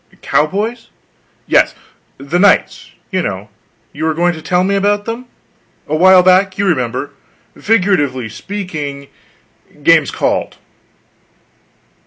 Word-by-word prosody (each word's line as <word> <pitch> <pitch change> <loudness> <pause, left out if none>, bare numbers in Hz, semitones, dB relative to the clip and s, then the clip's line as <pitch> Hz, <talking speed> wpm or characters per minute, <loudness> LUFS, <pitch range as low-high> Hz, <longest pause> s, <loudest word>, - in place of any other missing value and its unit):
"Cowboys?" 210 +10 -1 0.6
"Yes; - - +2 0.4
the 140 +6 -2
knights, 195 -1 +2 0.2
you 185 - 0
know: 95 - -5 0.4
You - - -4
were 160 -1 0
going 175 +1 +1
to 160 - -9
tell 180 +3 +1
me 195 +2 0
about 205 +1 +1
them. 235 +2 -6 0.6
A 155 - -1
while 185 +2 +6
back, 185 +1 +3
you 200 - 0
remember. 130 -6 -1 0.4
Figuratively 175 - +1
speaking, 150 - -6 0.7
game's - - +4
called." - - -2
180 Hz, 115 wpm, -15 LUFS, 145-200 Hz, 0.7 s, while